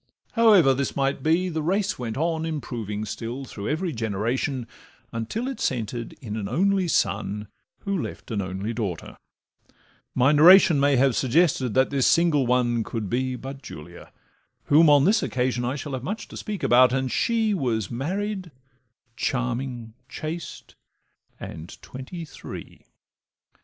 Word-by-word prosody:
However 205 - +6
this 140 +1 -2
might 135 0 0
be, 165 +5 +2
the 160 -3 -2
race 190 +4 0
went 115 -2 -4
on 160 +1 0
Improving 115 -10 -4
still 120 +5 -5
through 100 -4 -6
every 165 +4 -1
generation, 115 +4 -2 0.5
Until 115 - -3
it 265 -4 -5
centred 120 -1 -2
in 110 -5 -7
an 100 -2 -4
only 190 - +2
son, 105 -5 0 0.3
Who 200 -4 -1
left - - -7
an 105 -3 -1
only 95 +4 -4
daughter; 100 -8 -4 1.0
my 130 +3 +4
narration 165 +1 +7
May 140 0 +4
have 130 -1 +3
suggested 135 -3 +2
that 130 +1 +3
this 135 -2 +2
single 160 -6 +3
one 120 -2 +2
Could 110 -3 -5
be 130 +1 0
but 135 +2 -8
Julia 85 - -11 0.5
(whom 155 +2 +5
on 145 -1 +6
this 215 +4 +4
occasion 125 -1 -1
I 125 +3 -1
shall 145 -1 -6
have 130 - -3
much 210 +9 -4
to - - -10
speak 210 -2 -5
about), 125 +1 +6
and 130 -1 -1
she 225 -2 +1
Was 120 - -1
married, 190 - -3 0.7
charming, 125 -2 -2 0.2
chaste, 160 +1 -6 0.7
and 80 +2 -9
twenty 150 +7 -8
three. - - -10
130 Hz, 145 wpm, -25 LUFS, 115-165 Hz, 1.0 s, narration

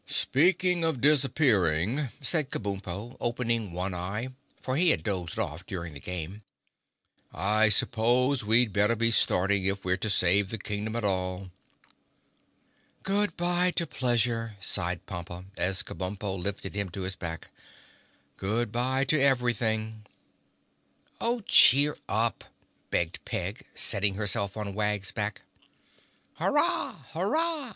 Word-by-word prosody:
"Speaking 175 +4 +2
of 160 -5 0
disappearing," 130 - +2
said 150 -1 +2
Kabumpo, 100 +2 -5
opening 115 -4 -1
one 90 +2 -3
eye, 100 +8 -3 0.3
for 130 - -3
he 175 +4 +4
had - - +2
dozed 90 -5 -3
off 85 -6 -3
during 85 -4 -6
the 70 - -9
game, 90 +5 -6 0.9
"I 110 +2 +2
suppose 120 +5 +2
we'd 110 0 +3
better 105 +4 +3
be 115 +1 +1
starting 95 -2 +3
if 95 0 -1
we're 90 0 +1
to 110 - -2
save 95 +1 +3
the 115 - -3
Kingdom 105 +2 -4
at 115 - -2
all." 95 -1 -2 1.5
"Good 200 -2 0
bye 175 +1 +2
to 170 - +3
pleasure," 115 -5 0
sighed 90 -2 -1
Pompa, 85 -1 -7
as 95 +1 0
Kabumpo 95 +1 -4
lifted 95 +1 -4
him 100 -1 -3
to 95 +2 -6
his 95 0 -4
back. 85 -3 -6 0.9
"Good 110 +3 -1
bye 130 +3 +1
to 140 +1 +2
everything!" 110 -5 0 1.1
"Oh, 235 0 -1
cheer 145 - +6
up," 110 +2 0 0.5
begged 85 +3 -2
Peg, 95 +6 -5
settling 100 -2 +2
herself 100 0 0
on 105 -2 -4
Wag's 105 -1 -1
back. 105 0 -3 1.0
"Hurrah! - - 0
Hurrah! 295 - -1
105 Hz, 130 wpm, -28 LUFS, 95-130 Hz, 1.5 s, cheer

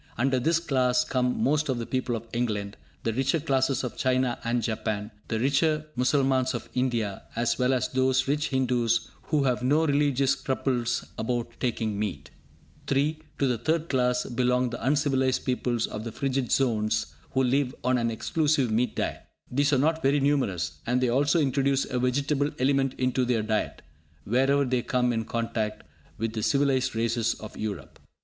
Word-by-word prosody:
Under 130 +2 +2
this 160 +5 +2
class 130 -6 +2
come 125 -1 0
most 150 +1 +1
of 130 - 0
the 115 - -3
people 130 -1 -1
of 115 0 -6
England, 105 -4 -2 0.3
the 115 - 0
richer 135 +6 +1
classes 135 -3 +1
of 125 - -5
China 130 -1 +1
and 120 0 0
Japan, 110 -1 -2 0.2
the 110 - -1
richer 150 +4 +2
Mussalmans 130 0 +2
of - - -6
India, 120 -6 -1
as 120 +2 0
well 125 +1 +3
as 130 -2 +1
those 130 0 +2
rich 150 +2 +1
Hindus 125 -4 +1
who 150 -2 +1
have 125 -2 +1
no 145 +6 +3
religious 140 -2 +2
scruples 125 -3 -1
about 120 +1 -2
taking 110 -4 -1
meat. 75 -10 -4 0.6
(3) 145 +3 +1 0.2
To 140 - +1
the 125 -4 0
third 160 +3 0
class 125 -2 +1
belong 125 0 +1
the 120 - -6
uncivilised 135 -1 +1
peoples 125 -2 0
of 105 - -6
the 115 - -5
frigid 135 0 -2
zones, 110 - +1 0.2
who 130 - +2
live 130 +1 +1
on 125 0 +2
an 115 0 0
exclusive 140 +2 +1
meat 120 +3 +1
diet. - - -2 0.3
These 140 +3 +2
are 140 - +4
not 160 +4 +1
very 140 +1 +3
numerous, 135 - 0
and 125 +1 +2
they 125 -1 +1
also 140 +7 +3
introduce 140 -1 +1
a 125 - -2
vegetable 140 +3 +1
element 135 0 +1
into 130 0 +1
their 120 -3 +1
diet, 110 0 -2 0.4
wherever 135 - +2
they 125 -1 0
come 125 0 +1
in 115 -1 -2
contact 115 -2 -2 0.3
with 115 0 -2
the 110 - -3
civilised 130 0 +1
races 115 0 0
of 110 - -10
Europe. 100 -10 -6
125 Hz, 175 wpm, -27 LUFS, 115-135 Hz, 0.6 s, are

